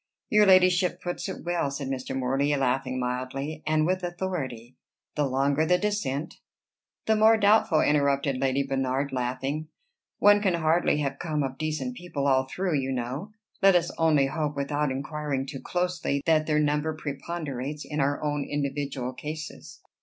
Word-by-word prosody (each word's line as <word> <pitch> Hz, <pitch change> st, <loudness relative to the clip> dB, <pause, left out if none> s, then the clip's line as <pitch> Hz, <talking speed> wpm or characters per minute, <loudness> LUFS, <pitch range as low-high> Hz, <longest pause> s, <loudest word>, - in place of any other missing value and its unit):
"Your 210 Hz, -1 st, +5 dB
ladyship 185 Hz, -1 st, +4 dB
puts 175 Hz, +2 st, -4 dB
it 190 Hz, -, -6 dB
well," 175 Hz, -4 st, 0 dB
said 140 Hz, 0 st, -5 dB
Mr. 130 Hz, 0 st, -3 dB
Morley, 135 Hz, +3 st, +1 dB
laughing 130 Hz, -1 st, 0 dB
mildly, 130 Hz, +5 st, -3 dB
"and 155 Hz, 0 st, +2 dB
with 185 Hz, +2 st, 0 dB
authority. 170 Hz, -10 st, -4 dB, 0.4 s
The 150 Hz, -2 st, 0 dB
longer 140 Hz, +3 st, +1 dB
the 180 Hz, +3 st, +3 dB
descent" 180 Hz, -8 st, -2 dB, 0.7 s
"The 220 Hz, -, +3 dB
more 220 Hz, +1 st, +6 dB
doubtful," 205 Hz, -6 st, +4 dB
interrupted 140 Hz, -2 st, +2 dB
Lady 135 Hz, +1 st, +1 dB
Bernard, 135 Hz, +1 st, -1 dB
laughing. 135 Hz, +4 st, -2 dB, 0.5 s
"One 205 Hz, 0 st, +6 dB
can 190 Hz, -4 st, +2 dB
hardly 160 Hz, -1 st, +2 dB
have 135 Hz, -1 st, -2 dB
come 155 Hz, -4 st, -1 dB
of 135 Hz, -1 st, -5 dB
decent 155 Hz, +11 st, -2 dB
people 155 Hz, -6 st, -4 dB
all 130 Hz, -1 st, +3 dB
through, 180 Hz, -4 st, -1 dB
you 135 Hz, 0 st, -2 dB
know. 130 Hz, -, -4 dB, 0.3 s
Let 195 Hz, -1 st, +6 dB
us 175 Hz, 0 st, +2 dB
only 155 Hz, -4 st, +4 dB
hope, 150 Hz, +1 st, -2 dB
without 145 Hz, +1 st, -1 dB
inquiring 140 Hz, 0 st, -3 dB
too 135 Hz, -1 st, -7 dB
closely, 175 Hz, -6 st, -1 dB
that 155 Hz, -2 st, +3 dB
their 150 Hz, -1 st, +2 dB
number 150 Hz, +1 st, +1 dB
preponderates 145 Hz, -1 st, -5 dB
in 150 Hz, 0 st, -4 dB
our 140 Hz, +2 st, 0 dB
own 145 Hz, -1 st, -1 dB
individual 140 Hz, -3 st, -3 dB
cases." 150 Hz, +3 st, -8 dB
145 Hz, 160 wpm, -27 LUFS, 135-170 Hz, 0.7 s, more